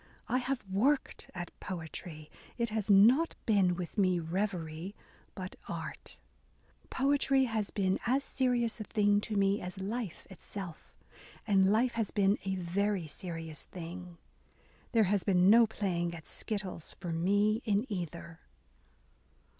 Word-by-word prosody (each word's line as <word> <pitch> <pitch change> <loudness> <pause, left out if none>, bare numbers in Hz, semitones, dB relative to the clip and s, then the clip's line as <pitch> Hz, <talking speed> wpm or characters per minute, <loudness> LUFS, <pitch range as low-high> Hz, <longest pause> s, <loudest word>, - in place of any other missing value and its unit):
I 255 - +2
have 260 -1 -2
worked 245 +10 +1
at 175 -1 -5
poetry 160 -3 -7
— - - -23
it 235 -1 0
has 215 -1 -2
not 235 +12 +6
been 195 -5 +3
with 180 +3 -4
me 185 -2 +3
reverie, 170 0 -3 0.4
but 185 -2 -6
art... - - -6 0.7
Poetry 275 0 +3
has 220 -4 -1
been 190 -2 0
as 265 +3 +2
serious 245 -4 0
a - - -3
thing 205 -1 +2
to 215 - -4
me 200 +1 +2
as 180 +2 -6
life 205 -1 -4
itself; 190 -2 -8 0.5
and 195 -2 +4
life 235 +4 +3
has 225 -3 -1
been 200 0 +2
a 190 0 0
very 190 +1 0
serious 165 -1 -6
thing; 175 0 -8 0.7
there 230 -3 +5
has 200 -1 +1
been 185 -1 +5
no 230 0 +7
playing 175 -5 -2
at 160 - -10
skittles 195 -7 -4
for 175 - -4
me 205 +6 +2
in 210 +1 +1
either. 170 -4 -5
200 Hz, 140 wpm, -32 LUFS, 180-220 Hz, 0.7 s, no